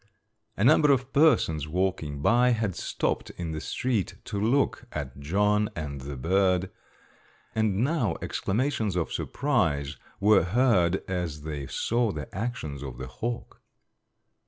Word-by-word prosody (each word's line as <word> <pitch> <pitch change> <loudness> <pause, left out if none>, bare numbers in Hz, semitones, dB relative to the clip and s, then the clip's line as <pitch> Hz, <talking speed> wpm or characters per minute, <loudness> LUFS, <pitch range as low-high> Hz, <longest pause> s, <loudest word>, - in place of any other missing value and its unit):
A 100 - +1
number 150 +3 +6
of 130 -1 0
persons 80 - +3
walking 80 -4 -1
by 125 +4 +4
had 110 -4 -1
stopped - - -2
in 85 -2 -4
the 80 -1 -4
street 115 -7 -1
to 100 -3 -4
look 120 +2 +1
at 70 -3 -5
John 105 +7 +2
and 70 -4 -5
the 70 +1 -6
bird, 90 +5 +2 0.8
and 110 -1 +1
now 155 +4 +1
exclamations 110 -2 -1
of 85 -2 -1
surprise 85 - 0 0.2
were 105 +2 +5
heard 95 -3 +2
as 85 -5 -3
they 75 -3 -5
saw 115 -1 0
the 75 -5 -7
actions 95 - -4
of 65 -4 -7
the 65 - -5
hawk. 115 - -5
95 Hz, 135 wpm, -27 LUFS, 75-120 Hz, 0.8 s, number